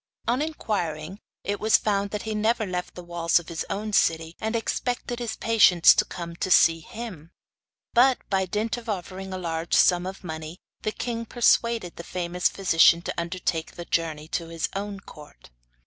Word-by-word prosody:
On 245 Hz, +4 st, +1 dB
inquiring, 190 Hz, -, -3 dB, 0.2 s
it 205 Hz, 0 st, -2 dB
was 220 Hz, +1 st, +5 dB
found 200 Hz, -1 st, 0 dB
that 210 Hz, 0 st, -4 dB
he 220 Hz, -, -3 dB
never 220 Hz, +1 st, +1 dB
left 180 Hz, -2 st, -4 dB
the 180 Hz, -, -8 dB
walls 170 Hz, -1 st, +1 dB
of 175 Hz, 0 st, -3 dB
his 165 Hz, -1 st, -3 dB
own 210 Hz, +1 st, -3 dB
city, 165 Hz, -2 st, +2 dB
and 220 Hz, +1 st, -2 dB
expected 245 Hz, +1 st, -2 dB
his 235 Hz, -2 st, -3 dB
patients 205 Hz, -7 st, +6 dB
to -, -, +2 dB
come 170 Hz, -1 st, -7 dB
to 185 Hz, -, -2 dB
see 165 Hz, -2 st, +5 dB
him; 185 Hz, -4 st, -8 dB, 0.6 s
but, 250 Hz, +2 st, +5 dB
by 190 Hz, -1 st, 0 dB
dint 215 Hz, +5 st, -1 dB
of 235 Hz, -1 st, -9 dB
offering 190 Hz, -1 st, -5 dB
a 185 Hz, -, -3 dB
large 165 Hz, -2 st, -2 dB
sum 180 Hz, 0 st, +4 dB
of 195 Hz, +1 st, -8 dB
money, 160 Hz, 0 st, -6 dB, 0.2 s
the 215 Hz, -, -1 dB
king 230 Hz, 0 st, -4 dB
persuaded 235 Hz, -5 st, +2 dB
the 170 Hz, -, -7 dB
famous 180 Hz, 0 st, -1 dB
physician 170 Hz, -3 st, +4 dB
to -, -, -3 dB
undertake 170 Hz, -1 st, -3 dB
the 175 Hz, -, -7 dB
journey 155 Hz, -3 st, -2 dB
to 165 Hz, 0 st, -3 dB
his 165 Hz, -1 st, -3 dB
own 200 Hz, 0 st, -4 dB
court. 150 Hz, -, -15 dB
185 Hz, 180 wpm, -25 LUFS, 170-220 Hz, 0.6 s, patients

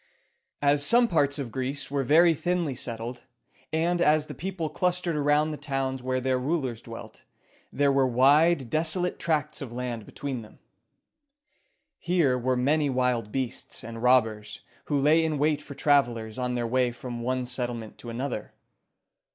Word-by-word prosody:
As 145 Hz, 0 st, +3 dB
some 240 Hz, +9 st, +6 dB
parts 145 Hz, -7 st, +1 dB
of 135 Hz, -5 st, -5 dB
Greece 135 Hz, +3 st, -3 dB
were 140 Hz, -1 st, 0 dB
very 165 Hz, +6 st, +5 dB
thinly 175 Hz, -2 st, -1 dB
settled, 120 Hz, 0 st, -5 dB, 0.5 s
and 170 Hz, +2 st, +1 dB
as 155 Hz, -2 st, +3 dB
the -, -, -8 dB
people 180 Hz, -2 st, -4 dB
clustered 180 Hz, +1 st, -1 dB
around 150 Hz, +1 st, +2 dB
the 150 Hz, -, -5 dB
towns 135 Hz, -2 st, -2 dB
where 130 Hz, 0 st, -1 dB
their 130 Hz, 0 st, 0 dB
rulers 130 Hz, -5 st, -2 dB
dwelt, 115 Hz, -1 st, -10 dB, 0.5 s
there 140 Hz, 0 st, +2 dB
were 135 Hz, -1 st, +3 dB
wide, 135 Hz, +2 st, +4 dB
desolate 165 Hz, +3 st, 0 dB
tracts 150 Hz, -2 st, -1 dB
of 135 Hz, -4 st, -6 dB
land 120 Hz, -3 st, -5 dB
between 140 Hz, -5 st, -5 dB
them. 110 Hz, -, -15 dB, 1.4 s
Here 170 Hz, -7 st, +2 dB
were 125 Hz, +1 st, 0 dB
many 145 Hz, +3 st, +2 dB
wild 125 Hz, -4 st, 0 dB
beasts 130 Hz, -1 st, -4 dB
and 115 Hz, 0 st, -7 dB
robbers, 110 Hz, -4 st, +2 dB, 0.2 s
who 145 Hz, -, 0 dB
lay 150 Hz, +4 st, +4 dB
in 155 Hz, -2 st, -1 dB
wait 150 Hz, +1 st, +1 dB
for 140 Hz, -, -10 dB
travelers 120 Hz, -6 st, +1 dB
on 125 Hz, 0 st, -1 dB
their 120 Hz, -1 st, -1 dB
way 125 Hz, +1 st, +1 dB
from 120 Hz, 0 st, -7 dB
one 130 Hz, +1 st, -1 dB
settlement 120 Hz, -3 st, -5 dB
to 120 Hz, -, -8 dB
another. 120 Hz, -1 st, -4 dB
135 Hz, 160 wpm, -27 LUFS, 125-155 Hz, 1.4 s, some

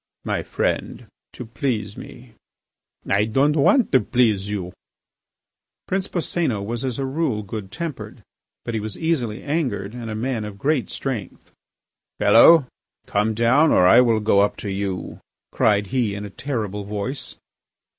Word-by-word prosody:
"My -, -, -1 dB
friend, -, -, -2 dB, 0.3 s
to 125 Hz, -, -8 dB
please 110 Hz, -4 st, -3 dB
me... 120 Hz, -2 st, -12 dB, 0.4 s
." -, -, -48 dB
"I 100 Hz, +2 st, +2 dB
don't 135 Hz, +7 st, +2 dB
want 215 Hz, -, +3 dB
to 130 Hz, -, +5 dB
please 110 Hz, -7 st, +1 dB
you." 95 Hz, -3 st, -4 dB, 1.1 s
Prince 190 Hz, +1 st, -1 dB
Boscénos 160 Hz, -, -1 dB
was 120 Hz, +3 st, -4 dB
as 130 Hz, -3 st, -2 dB
a 135 Hz, -, -2 dB
rule 135 Hz, -6 st, -1 dB
good 100 Hz, -1 st, -7 dB
tempered, 165 Hz, 0 st, -6 dB, 0.4 s
but 115 Hz, -, -4 dB
he 110 Hz, -, -1 dB
was 105 Hz, 0 st, -5 dB
easily 130 Hz, -10 st, -1 dB
angered 125 Hz, -10 st, -2 dB
and 120 Hz, -2 st, -7 dB
a 110 Hz, -, -4 dB
man 115 Hz, 0 st, -2 dB
of 105 Hz, -1 st, -7 dB
great 140 Hz, +4 st, 0 dB
strength. 115 Hz, -4 st, -5 dB, 0.7 s
"Fellow, 130 Hz, +8 st, +7 dB, 0.4 s
come 105 Hz, +2 st, 0 dB
down 125 Hz, +8 st, +4 dB
or 90 Hz, -, +5 dB
I 90 Hz, -, +7 dB
will 115 Hz, -3 st, +2 dB
go 105 Hz, -2 st, +3 dB
up 100 Hz, +1 st, +2 dB
to 100 Hz, -, -2 dB
you," 95 Hz, -1 st, -4 dB, 0.3 s
cried 105 Hz, -2 st, +2 dB
he, 115 Hz, -6 st, 0 dB
in 105 Hz, +1 st, -6 dB
a 100 Hz, -, -9 dB
terrible 110 Hz, -5 st, -4 dB
voice. 105 Hz, +7 st, -5 dB
115 Hz, 155 wpm, -22 LUFS, 105-135 Hz, 1.1 s, Fellow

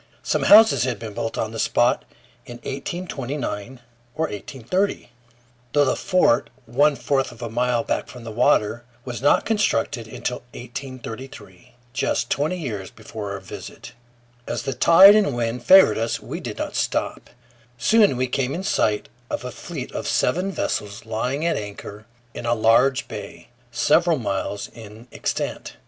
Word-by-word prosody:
Some -, -, 0 dB
houses 220 Hz, -, +8 dB
had 125 Hz, -3 st, -1 dB
been 110 Hz, 0 st, -7 dB
built 115 Hz, -, -4 dB
on 110 Hz, -, -2 dB
the 115 Hz, -, -6 dB
spot 120 Hz, +1 st, +2 dB, 0.4 s
in 120 Hz, -, -8 dB
1829 135 Hz, -, -5 dB, 0.3 s
or 160 Hz, -, -1 dB
1830, 135 Hz, -, -3 dB, 0.6 s
though 145 Hz, -1 st, +4 dB
the 130 Hz, -, +1 dB
fort, 180 Hz, -10 st, +2 dB, 0.2 s
one 140 Hz, +5 st, +3 dB
fourth 135 Hz, -2 st, 0 dB
of 120 Hz, 0 st, -11 dB
a 115 Hz, -, -5 dB
mile 120 Hz, 0 st, +1 dB
back -, -, -2 dB
from 125 Hz, -2 st, -11 dB
water, 115 Hz, 0 st, +1 dB, 0.2 s
was 125 Hz, -2 st, -5 dB
not 145 Hz, -, +3 dB
constructed 120 Hz, -, 0 dB
until 125 Hz, +2 st, -4 dB, 0.2 s
1833, 125 Hz, -4 st, -9 dB, 0.2 s
just -, -, -1 dB
twenty 155 Hz, +6 st, 0 dB
years 110 Hz, -, -5 dB
before 105 Hz, -2 st, -7 dB
our 100 Hz, -, -5 dB
visit. -, -, -10 dB, 0.6 s
As -, -, -3 dB
the 135 Hz, -, -2 dB
tide 190 Hz, -, +8 dB
and 200 Hz, -, +2 dB
wind 120 Hz, +1 st, -2 dB
favored 190 Hz, -7 st, +7 dB
us, 115 Hz, +1 st, -1 dB
we -, -, -6 dB
did -, -, -6 dB
not -, -, -4 dB
stop. -, -, -2 dB, 0.5 s
Soon 205 Hz, -, +4 dB
we 130 Hz, -, +1 dB
came 130 Hz, +1 st, -1 dB
in 185 Hz, -, -4 dB
sight 105 Hz, -, +1 dB, 0.2 s
of -, -, -4 dB
a -, -, -4 dB
fleet -, -, -7 dB
of -, -, -4 dB
seven 185 Hz, +3 st, +1 dB
vessels 105 Hz, -, -3 dB
lying 125 Hz, +7 st, -2 dB
at 170 Hz, -, +1 dB
anchor 105 Hz, +1 st, -8 dB, 0.3 s
in 120 Hz, -, -6 dB
a 120 Hz, -, +2 dB
large 120 Hz, +5 st, +3 dB
bay, 100 Hz, -1 st, -9 dB, 0.2 s
several 165 Hz, +7 st, +3 dB
miles 100 Hz, -3 st, -3 dB
in 110 Hz, +1 st, -12 dB
extent. -, -, -4 dB
125 Hz, 155 wpm, -23 LUFS, 115-145 Hz, 0.6 s, houses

